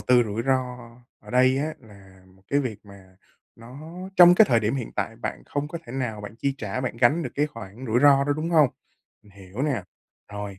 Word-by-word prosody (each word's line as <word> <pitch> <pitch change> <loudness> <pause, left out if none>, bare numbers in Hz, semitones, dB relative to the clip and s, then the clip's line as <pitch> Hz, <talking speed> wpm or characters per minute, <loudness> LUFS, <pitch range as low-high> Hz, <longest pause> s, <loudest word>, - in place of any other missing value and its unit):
tư 125 -1 +4
rủi 110 +2 -3
ro 135 0 +3 0.6
ở - - -14
đây 130 +1 +3
á 155 +2 -2
là 95 -4 -17
một 95 +1 -24
cái 140 +1 +2
việc 115 -7 -4
mà 95 -2 -16 0.4
nó 135 +8 -11 0.2
trong 175 0 +9
cái 220 - +7
thời 115 -2 +3
điểm 110 +5 0
hiện 125 -5 -5
tại 105 +2 -3
bạn - - -5
không 145 +1 -3
có 170 - -6
thể 120 - -9
nào 120 -6 -3
bạn 105 +1 -9
chi 140 +2 -1
trả, 105 +4 -4
bạn 125 -2 -4
gánh 145 +9 +3
được - - -4
cái 150 +1 +1
khoản 115 -2 -10
rủi 115 +2 +1
ro 140 -1 +6
đó, 145 - +1
đúng 160 +2 -3
hông? 155 -5 +5 0.5
Mình 105 - -20
hiểu 100 +5 -8
nè. 135 -10 -1 0.5
Rồi, 100 -2 -6
120 Hz, 225 wpm, -24 LUFS, 105-140 Hz, 0.6 s, trong